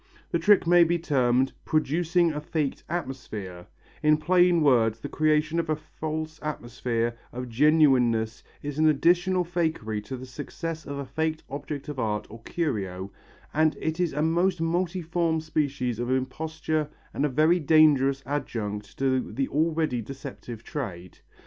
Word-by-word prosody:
The 170 - +1
trick 200 +3 +5
might 175 0 +6
be 170 +1 +2
termed 130 -5 +2
"producing 165 +3 +2
a 150 - -4
faked 150 -2 -2
atmosphere," 110 - -5 0.3
in 150 0 +4
plain 175 +1 +4
words 115 -5 +3
the - - -5
creation 155 +1 +2
of 165 -1 -2
a 155 - +2
false 155 +1 -5
atmosphere 120 -5 -2 0.2
of 125 0 -6
genuineness 125 -5 +3 0.2
is 145 +1 -4
an 155 0 +5
additional 175 +5 +3
fakery 160 -12 -2
to 130 +5 -5
the 130 - -8
success 160 +4 -6
of 140 - -4
a 140 - -4
faked 155 +4 -2
object 145 +1 -5
of 145 -3 -5
art 105 -3 -1
or 115 +1 -10
curio, 100 - -3 0.4
and 155 0 +2
it 160 +2 -2
is 175 -2 +1
a 150 +2 0
most 175 +3 +2
multiform 170 -1 0
species 140 -6 -1
of 120 0 -2
imposture 155 +4 -1 0.2
and - - -1
a 150 - +2
very 155 +6 +3
dangerous 140 -3 +4
adjunct 105 -7 -4
to 130 -1 0
the 135 0 -1
already 155 -4 +1
deceptive 125 -2 -8
trade. 90 - -6
150 Hz, 150 wpm, -26 LUFS, 125-160 Hz, 0.4 s, might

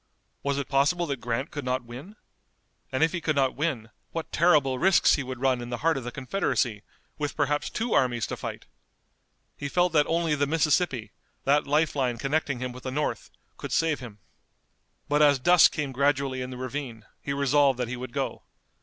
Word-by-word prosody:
Was 140 0 -1
it 140 - -3
possible 150 +6 +2
that 140 -6 -4
Grant 120 +4 -2
could 145 - -5
not 125 0 -1
win? 130 - -10 0.8
And 130 +4 +1
if 160 - +3
he 175 - -3
could 155 -2 0
not 135 -2 +2
win 130 -7 -2 0.2
what 165 -1 -5
terrible 145 -6 +3
risks 190 +1 +5
he - - +1
would 130 -2 -6
run 130 -2 +1
in 120 - -7
the 120 - -3
heart 165 - +4
of 135 - -4
the 120 - -5
Confederacy, 130 - -1 0.4
with 145 -1 -2
perhaps 145 0 0
two 230 +1 -2
armies 120 -4 +2
to - - -4
fight! - - -7 0.9
He 145 - -5
felt 175 +2 +2
that 150 -2 +4
only 165 -1 +1
the 145 -1 +1
Mississippi, 150 - +1 0.3
that 145 +2 +2
life 150 +2 +2
line 125 -4 0
connecting 140 +1 -1
him 125 0 -3
with 125 +1 -10
the 130 - -5
North, 150 +3 -2 0.3
could - - -7
save 160 -2 +1
him. 115 -5 -10 0.9
But 145 +1 +2
as 145 -2 +6
dusk 175 +6 +6
came 145 -3 -3
gradually 135 -1 0
in 125 - -4
the 125 - -7
ravine 125 -3 -5 0.2
he - - -4
resolved 140 -1 +3
that 125 -2 -2
he 125 - -4
would 125 0 -7
go. - - -3
140 Hz, 200 wpm, -27 LUFS, 125-150 Hz, 0.9 s, as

